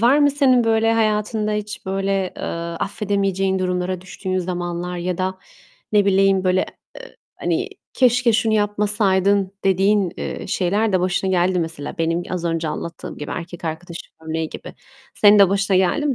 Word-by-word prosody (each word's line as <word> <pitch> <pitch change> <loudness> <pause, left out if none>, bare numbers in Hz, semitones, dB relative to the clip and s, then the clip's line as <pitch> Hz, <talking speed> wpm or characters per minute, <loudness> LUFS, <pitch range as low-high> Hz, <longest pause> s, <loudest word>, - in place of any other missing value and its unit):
var 250 +6 +5
mı 290 -1 +5
senin 260 -4 +3
böyle 225 0 +3
hayatında 215 -1 0
hiç 210 -1 -5
böyle, 195 +1 -1 0.2
eee, - - -8 0.4
affedemeyeceğin 195 -2 0
durumlara 180 0 -1
düştüğün 185 +1 -4
zamanlar? 175 0 -3
Ya 180 +1 -3
da 185 0 -2 0.5
ne 205 -1 +4
bileyim, 195 -1 +3
böyle, 185 0 +2 0.3
eee, - - -12 0.2
hani, - - -1 0.2
"Keşke 245 -2 +3
şunu 220 0 +2
yapmasaydın." 205 -2 +1
dediğin, 195 -1 +2
eee, - - -5
şeyler 200 +4 0
de 185 - +2
başına 185 +1 0
geldi 180 0 +2
mi? 180 - 0
Mesela 160 -3 -6
benim 165 +1 0
az 180 -2 -3
önce 165 -1 -1
anlattığım 165 +2 -6
gibi, 150 - -6
erkek 175 -1 -6
arkadaş 165 +2 -5 0.3
örneği 160 0 -2
gibi. - - -9 0.4
Senin 205 0 +6
de 195 -2 +7
başına 195 0 +1
geldi 190 +11 +2
mi 275 - +1
190 Hz, 165 wpm, -21 LUFS, 180-210 Hz, 0.5 s, de